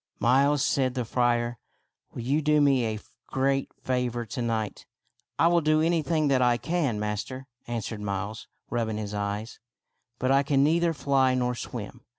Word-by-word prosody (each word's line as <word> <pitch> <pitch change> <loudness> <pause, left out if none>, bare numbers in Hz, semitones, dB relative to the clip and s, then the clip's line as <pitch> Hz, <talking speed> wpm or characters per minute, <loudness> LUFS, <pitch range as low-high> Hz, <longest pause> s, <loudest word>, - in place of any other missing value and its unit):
" - - -47
Miles," 135 +4 +3
said 130 -2 +1
the 125 -2 -1
friar, 120 0 0 0.2
" - - -51
will 120 - -6
you 140 +6 +1
do 150 0 +3
me 135 -4 +3
a 110 -1 -3 0.3
great 135 0 0
favor 125 -2 -1
to 125 +4 -5
night? 110 -3 -2
" - - -43
" - - -60
I - - +4
will 170 0 +4
do 155 0 +3
anything 160 -1 +1
that 130 -2 +3
I 120 -1 +4
can, 140 -4 -1
master," 105 +5 -4 0.2
answered 115 -2 -4
Miles, 100 +1 -4 0.2
rubbing 115 -3 -1
his 105 -1 -5
eyes; 105 +2 -4 0.3
" 120 -1 -52
but 130 +2 0
I 135 0 +5
can 140 -1 +2
neither 165 +2 +2
fly 135 -1 +2
nor 125 -1 0
swim. 120 - -7
125 Hz, 185 wpm, -27 LUFS, 115-140 Hz, 0.3 s, I